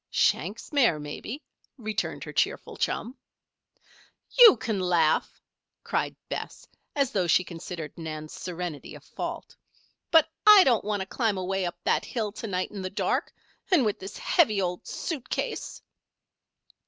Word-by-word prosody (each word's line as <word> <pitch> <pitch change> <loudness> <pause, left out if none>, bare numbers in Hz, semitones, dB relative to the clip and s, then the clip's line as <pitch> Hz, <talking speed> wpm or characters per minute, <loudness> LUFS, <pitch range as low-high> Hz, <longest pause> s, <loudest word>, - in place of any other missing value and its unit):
"Shank's 200 - 0
mare, 240 - +4
maybe," 180 - -7 0.3
returned 215 -3 -3
her - - -8
cheerful - - -1
chum. 245 +3 -2 1.2
"You 475 - +9
can 220 -2 -2
laugh!" 175 -4 +1 0.4
cried - - -1
Bess, - - -6 0.3
as 275 -3 +1
though 185 -3 0
she 175 +3 +4
considered 170 -2 -7
Nan's 155 -2 -7
serenity 175 -4 -6
a - - -10
fault. - - -7 0.5
"But 325 -1 +6 0.2
I 420 -3 +10
don't 240 -7 +3
want 205 -1 -1
to - - -3
climb 215 0 -1
away 185 0 -1
up 175 - -6
that - - +2
hill 220 -4 -3
to 225 - -7
night 185 -2 -2
in 205 -2 -6
the 185 - -3
dark, 195 - -1 0.4
and 340 - +4
with 210 - -1
this 190 - -8
heavy 245 - +3
old 180 -2 -3
suit 275 -6 -5
case." - - -4
200 Hz, 150 wpm, -27 LUFS, 180-240 Hz, 1.2 s, I